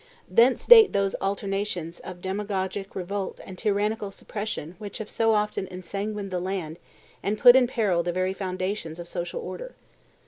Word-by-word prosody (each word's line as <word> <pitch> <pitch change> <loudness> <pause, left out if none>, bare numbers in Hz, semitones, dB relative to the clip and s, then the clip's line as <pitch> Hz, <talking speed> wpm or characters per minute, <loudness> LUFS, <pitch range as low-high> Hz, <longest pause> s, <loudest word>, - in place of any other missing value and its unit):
Thence 240 +2 +4
date 450 -3 +9
those 200 -1 +1
alternations 195 -3 -2
of 180 -1 -9
demagogic 195 0 -3
revolt 195 +1 -4
and 190 - -9
tyrannical 210 +1 0
suppression 200 -5 -5
which 205 -2 -7
have 220 - -7
so 225 -1 +3
often 210 -2 -1
ensanguined 195 +2 -5
the 180 - -1
land 175 -3 -4 0.4
and 210 +2 -1
put 245 +3 +8
in 260 -2 +5
peril 205 -8 +1
the 175 +1 -1
very 185 +1 0
foundations 185 -3 -3
of 175 -1 -8
social 175 - -4
order. - - -7
195 Hz, 160 wpm, -26 LUFS, 185-210 Hz, 0.4 s, date